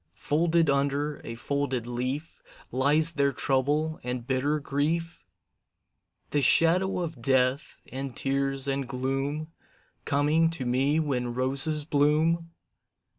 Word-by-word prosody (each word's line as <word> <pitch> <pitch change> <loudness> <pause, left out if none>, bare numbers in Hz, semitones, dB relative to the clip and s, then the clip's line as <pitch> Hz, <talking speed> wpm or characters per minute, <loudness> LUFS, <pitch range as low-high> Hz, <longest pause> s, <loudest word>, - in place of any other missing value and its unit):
Folded 165 +2 +1
under 140 +1 0
a 115 - -6
folded 135 -1 -2
leaf, 130 +6 -4 0.3
Lies 150 +6 +2
there 140 -2 +2
trouble 145 +4 0
and 125 -1 -4
bitter 135 +4 0
grief? 160 +4 -2 1.1
The 145 - +2
shadow 180 +6 +3
of 160 -7 -5
death, 130 +2 +1
and 135 -1 -5
tears, 135 0 -1
and 135 -1 -1
gloom 135 +4 -2 0.6
Coming 150 +3 +2
to 165 -6 -5
me 135 +5 +2
when 125 -6 -1
roses 140 +4 0
bloom? 160 +3 +2
140 Hz, 115 wpm, -27 LUFS, 130-155 Hz, 1.1 s, shadow